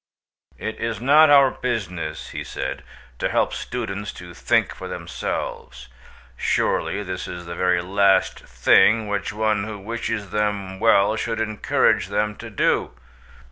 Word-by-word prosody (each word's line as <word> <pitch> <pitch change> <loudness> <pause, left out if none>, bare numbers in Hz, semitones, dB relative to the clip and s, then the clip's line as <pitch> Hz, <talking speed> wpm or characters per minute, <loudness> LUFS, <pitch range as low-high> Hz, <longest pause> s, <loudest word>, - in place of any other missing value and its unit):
"It 110 - -5
is 115 -2 -2
not 145 +5 +6
our 140 -2 +6
business," 90 - -4
he - - -5
said, - - -5 0.4
"to - - 0
help - - +1
students 105 -4 -4
to 90 -1 -11
think - - +1
for - - -8
themselves. 65 - -5 0.5
Surely 105 +9 0
this 95 -1 -5
is 90 0 -7
the 85 - -6
very 90 0 +1
last 95 +1 +2
thing 105 - +3
which 100 -1 -2
one 110 -1 0
who 110 -1 -6
wishes 110 -1 -4
them 100 -3 -2
well 110 -1 +4
should 115 +1 -2
encourage 110 -2 +1
them 105 0 -1
to - - -8
do. - - 0
105 Hz, 140 wpm, -22 LUFS, 90-110 Hz, 0.5 s, not